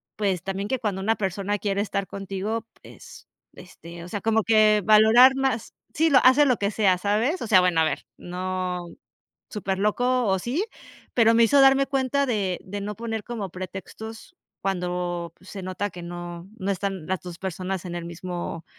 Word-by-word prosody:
Pues, 195 Hz, -5 st, 0 dB
también 195 Hz, +1 st, -3 dB
que, 260 Hz, -, 0 dB
cuando 205 Hz, -5 st, -2 dB
una 220 Hz, +3 st, +1 dB
persona 200 Hz, +1 st, -2 dB
quiere 200 Hz, -1 st, -1 dB
estar 200 Hz, -1 st, -2 dB
contigo, 200 Hz, +3 st, -4 dB, 0.2 s
pues -, -, -14 dB, 0.3 s
este, 170 Hz, -1 st, -12 dB
o -, -, -9 dB
sea, 205 Hz, 0 st, -4 dB
como 225 Hz, 0 st, +2 dB
que 215 Hz, -1 st, +4 dB
valorar 220 Hz, +5 st, +7 dB
más. 265 Hz, -4 st, -1 dB, 0.2 s
Sí, 320 Hz, +2 st, +3 dB
lo 275 Hz, -4 st, +6 dB
hace, 260 Hz, +3 st, +6 dB
lo 250 Hz, -4 st, +3 dB
que 200 Hz, 0 st, -1 dB
sea, 195 Hz, -4 st, +3 dB
¿sabes? 220 Hz, -, 0 dB
O -, -, -4 dB
sea, 200 Hz, -4 st, +6 dB
bueno, 180 Hz, -3 st, +2 dB
a -, -, +4 dB
ver, 155 Hz, -, -2 dB
no 180 Hz, 0 st, -4 dB, 0.6 s
superloco, 210 Hz, +5 st, 0 dB
o 190 Hz, -1 st, +2 dB
sí, 255 Hz, -, -1 dB, 0.5 s
pero, 230 Hz, -2 st, +5 dB
me 230 Hz, 0 st, +6 dB
hizo 280 Hz, +5 st, +5 dB
darme 270 Hz, 0 st, +5 dB
cuenta 275 Hz, +1 st, 0 dB
de 200 Hz, -7 st, -1 dB
de 200 Hz, +2 st, -6 dB
no 210 Hz, +1 st, -4 dB
poner 225 Hz, -2 st, -4 dB
como 225 Hz, -5 st, -5 dB
pretextos, 205 Hz, -, -8 dB, 0.2 s
cuando 180 Hz, -2 st, -2 dB
pues, 185 Hz, -, -18 dB
se 195 Hz, -2 st, -7 dB
nota 185 Hz, +2 st, -3 dB
que 175 Hz, 0 st, -10 dB
no 175 Hz, 0 st, -7 dB
no 195 Hz, -1 st, -2 dB
están 195 Hz, -3 st, -3 dB
las 190 Hz, -1 st, -2 dB
2 175 Hz, -2 st, -8 dB
personas 190 Hz, 0 st, -4 dB
en 175 Hz, -, -5 dB
el 175 Hz, -1 st, -5 dB
mismo 170 Hz, -1 st, -6 dB
200 Hz, 185 wpm, -25 LUFS, 185-225 Hz, 0.6 s, valorar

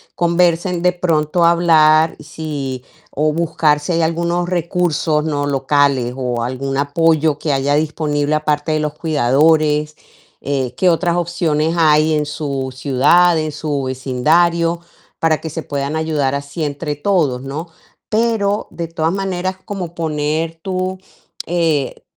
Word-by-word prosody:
conversen 175 Hz, +1 st, +1 dB
de 180 Hz, 0 st, +3 dB
pronto 170 Hz, -1 st, 0 dB
hablar 160 Hz, -2 st, +4 dB
si 145 Hz, -4 st, -5 dB, 0.3 s
o 150 Hz, +2 st, 0 dB
buscar 155 Hz, -2 st, +1 dB
si 150 Hz, -, -3 dB
hay 165 Hz, -, +1 dB
algunos 170 Hz, +2 st, 0 dB
recursos, 170 Hz, -3 st, 0 dB
¿no?, 145 Hz, -2 st, -1 dB
locales 140 Hz, -2 st, +1 dB
o 125 Hz, -3 st, -2 dB
algún 130 Hz, +3 st, -3 dB
apoyo 155 Hz, +1 st, +2 dB
que 150 Hz, -, -2 dB
haya 140 Hz, +1 st, +1 dB
disponible 150 Hz, -1 st, -1 dB
aparte 150 Hz, 0 st, -1 dB
de 155 Hz, -, +1 dB
los 150 Hz, -1 st, -2 dB
cuidadores, 150 Hz, +1 st, +2 dB, 0.5 s
eh, 135 Hz, -3 st, -2 dB
qué 185 Hz, -, +3 dB
otras 175 Hz, 0 st, +1 dB
opciones 165 Hz, -2 st, 0 dB
hay 155 Hz, -1 st, +4 dB
en 150 Hz, -1 st, 0 dB
su 140 Hz, -3 st, -4 dB
ciudad, 145 Hz, +6 st, +3 dB
en 155 Hz, -1 st, -2 dB
su 145 Hz, -2 st, -3 dB
vecindario, 165 Hz, +7 st, +1 dB, 0.4 s
para 160 Hz, -1 st, +2 dB
que 160 Hz, -, -6 dB
se 160 Hz, +1 st, -5 dB
puedan 140 Hz, +1 st, -3 dB
ayudar 155 Hz, -4 st, 0 dB
así 140 Hz, +3 st, -5 dB
entre 145 Hz, +1 st, -3 dB
todos, 145 Hz, -6 st, 0 dB
¿no? 145 Hz, +5 st, -5 dB, 0.4 s
Pero 215 Hz, -2 st, 0 dB
de 170 Hz, -1 st, -5 dB
todas 165 Hz, 0 st, -1 dB
maneras 190 Hz, -1 st, -2 dB
como 185 Hz, -5 st, -6 dB
poner 160 Hz, +1 st, -2 dB
tu, 185 Hz, +1 st, -3 dB, 0.5 s
eh, 165 Hz, -5 st, -1 dB
155 Hz, 140 wpm, -18 LUFS, 145-170 Hz, 0.5 s, hablar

